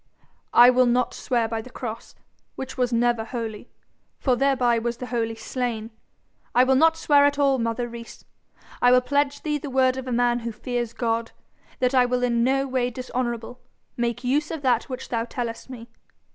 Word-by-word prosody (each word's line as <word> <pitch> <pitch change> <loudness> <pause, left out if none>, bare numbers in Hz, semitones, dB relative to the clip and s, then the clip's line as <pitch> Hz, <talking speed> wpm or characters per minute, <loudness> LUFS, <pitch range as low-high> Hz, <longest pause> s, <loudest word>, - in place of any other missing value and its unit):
'I 245 +1 +8
will 255 0 +4
not 245 +1 +1
swear 235 -3 -1
by 225 0 -3
the 255 - -12
cross, 230 -2 -7 0.4
which 265 0 -6
was 250 -1 0
never 235 -1 +1
holy, 225 -1 -6 0.5
for 255 -3 +1
thereby 250 -3 +2
was 235 +1 -3
the 250 - -6
Holy 230 -2 -2
slain. 230 -1 -4 0.6
I 250 - +6
will 260 +1 +3
not 325 +4 +4
swear 290 -3 +4
at 285 0 +2
all, 275 -2 +3
mother 230 +1 -1
Rees. 235 0 -11 0.6
I 245 - +5
will 250 0 +6
pledge 285 +2 0
thee 300 -1 -1
the 285 - -6
word 260 0 +2
of 260 -1 -6
a - - -3
man 240 0 +2
who 235 0 -4
fears 240 +1 -4
God, 230 -1 -2 0.4
that 250 +1 +1
I 255 -1 +5
will 250 0 -1
in 235 -1 +2
no 270 +2 +1
way 255 -2 0
dishonourable 245 -1 -4 0.3
make 235 0 -2
use 290 +5 0
of 320 -3 -5
that 245 -3 +2
which 255 - -6
thou 230 -1 -1
tellest 235 0 -5
me. 235 -3 -9
245 Hz, 190 wpm, -24 LUFS, 235-260 Hz, 0.6 s, I